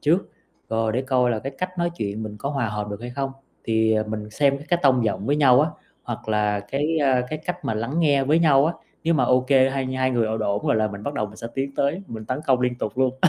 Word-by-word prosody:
trước, 170 +6 +1 0.4
rồi 110 -1 0
để 130 +3 0
coi 130 -2 +2
là 110 - 0
cái 135 +4 -5
cách 185 0 -4
nói 175 0 +1
chuyện 105 +1 -3
mình 105 -1 -6
có 140 - -3
hòa 135 -6 -1
hợp 105 0 -4
được 100 +1 -6
hay 120 +1 -6
không. 135 +1 -3 0.3
Thì 110 -1 +2
mình 105 -1 -5
xem 140 +4 +2
cái 175 - +2
c - - -14
tông 130 -4 +4
giọng 100 -1 -1
với 145 +2 +2
nhau 135 -3 +6
á, 155 - +2 0.3
hoặc 120 -2 -6
là 105 -1 +1
cái, 145 +10 -1
a, 130 -2 +3
cái 155 - -3
cách 180 0 -4
mà 110 - -1
lắng 115 +7 -3
nghe 145 -5 +3
với 155 +4 +3
nhau 145 -3 +5
á, 170 - 0 0.3
nếu 165 +1 +3
mà 135 -5 +3
ô 125 +1 +4
kê 130 0 +4
hai 135 -1 -2
hai 130 0 0
người 120 -3 +1
ổn 110 +1 -2
ổn 100 -1 -1
rồi - - +3
là 110 0 +2
mình 100 0 -8
bắt 145 - -4
đầu 105 - -1
mình 105 +1 -13
sẽ 115 - -6
tiến 135 +1 -3
tới 150 +8 0
mình 110 -6 -7
tấn 130 +5 -3
công 130 -2 +3
liên 125 -1 +1
tục 110 +1 -4
luôn. 130 -1 +2
130 Hz, 280 wpm, -23 LUFS, 110-140 Hz, 0.4 s, nhau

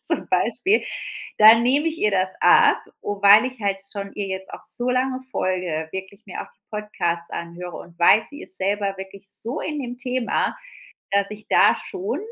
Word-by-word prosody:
zum - - -1
Beispiel, 415 +4 +2 0.6
dann 220 +2 +8
nehme 280 +6 +2
ich 325 0 -2
ihr 210 - +3
das 190 -1 +1
ab - - +5 0.2
o 205 -1 -4
weil 205 +3 +8
ich 255 -2 -8
halt 195 -1 -1
schon 200 -1 -6
ihr 205 - -3
jetzt 190 0 -5
auch - - -9
so 245 +1 -2
lange 255 +1 0
folge, 180 -6 -2
wirklich 190 +2 -8
mir 185 - -6
auch - - -15
die - - -50
Podcasts 175 -5 -3
anhöre 170 +1 -6
und 170 0 -12
weiß, 210 +5 +6
sie 290 +4 -10
ist 370 - -3
selber 200 0 -1
wirklich 195 0 -9
so 235 +7 -4
in 300 -1 -4
dem 245 -1 -5
Thema, 250 -1 -1 0.6
dass 200 0 +2
ich 210 0 -10
da - - +5
schon 390 +3 -4
205 Hz, 190 wpm, -23 LUFS, 190-250 Hz, 0.6 s, dann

